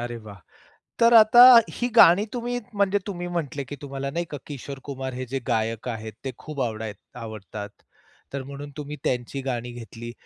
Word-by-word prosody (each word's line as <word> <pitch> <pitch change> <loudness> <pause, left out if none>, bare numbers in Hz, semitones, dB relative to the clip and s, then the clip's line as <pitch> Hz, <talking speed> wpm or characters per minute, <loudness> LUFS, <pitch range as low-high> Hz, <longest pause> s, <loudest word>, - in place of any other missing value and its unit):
अरे 120 0 -4
वाह! 105 -3 -11 0.6
तर 235 0 +5
आता 225 +1 +8 0.3
ही 245 - -2
गाणी 200 -1 +8
तुम्ही 245 0 -2 0.2
म्हणजे 200 0 +2
तुम्ही 175 -3 -4
म्हटले, 150 -5 -3
की 145 - -8
तुम्हाला 140 0 -4
नाही 170 +3 -2
का 145 - -4
किशोर 140 -1 -7
कुमार 130 -2 -5
हे 130 +1 -4
जे 135 +2 -3
गायक 115 0 -1
आहेत, 110 -2 -5
ते 135 - -2
खूप 150 -3 -7
आवडाय 110 -2 -3 0.3
आवडतात. 105 -2 -7 0.6
तर 140 - -3
म्हणून 140 +2 -8
तुम्ही 150 0 -6
त्यांची 125 +2 -2
गाणी 125 -2 -3
घेतली. 120 0 -9
135 Hz, 175 wpm, -25 LUFS, 120-165 Hz, 0.6 s, आता